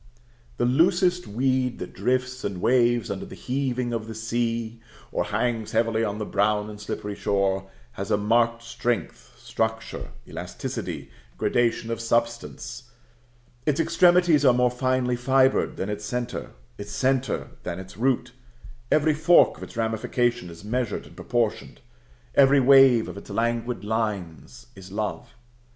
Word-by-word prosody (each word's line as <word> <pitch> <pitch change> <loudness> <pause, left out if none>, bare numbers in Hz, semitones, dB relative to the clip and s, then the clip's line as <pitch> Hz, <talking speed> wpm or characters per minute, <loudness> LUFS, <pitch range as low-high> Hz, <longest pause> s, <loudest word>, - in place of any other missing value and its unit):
The 120 - +1
loosest 180 +6 +3
weed 130 +2 0
that - - -7
drifts 130 0 -1
and 100 -3 -3
waves 120 0 +2
under 95 - -5
the - - -10
heaving 125 -2 -2
of 110 -1 -3
the 110 - -7
sea, 115 0 -2 0.3
or - - -1
hangs 115 -3 -1
heavily 115 0 +2
on 105 -1 -2
the 105 - -3
brown 105 +1 +1
and 105 0 -10
slippery 105 0 -4
shore, 95 -1 0 0.2
has 100 - -6
a - - +3
marked 115 +2 +2
strength, 120 0 -3
structure, 110 0 -3 0.2
elasticity, - - -6 0.3
gradation 115 -1 +1
of 115 - -3
substance; 120 +1 -2 0.8
its 150 0 +2
extremities 170 -1 +4
are 125 -3 +6
more 125 0 +3
finely 130 0 0
fibred 130 +2 +2
than 95 - -2
its 105 0 -4
centre, 120 +3 -4 0.3
its 100 0 -7
centre 130 0 0
than 85 -1 -5
its 95 0 -9
root; 125 +1 0 0.6
every 155 0 +4
fork 165 +4 +5
of - - -15
its - - -10
ramification 115 -2 0
is 85 +2 -12
measured 120 0 -2
and - - -15
proportioned; 120 -3 -2 0.5
every 140 0 +6
wave 135 -3 +6
of - - -7
its 100 - -11
languid 115 0 -1
lines 105 0 -3
is 95 -1 -12
love. 105 +1 -4
120 Hz, 145 wpm, -25 LUFS, 110-130 Hz, 0.8 s, are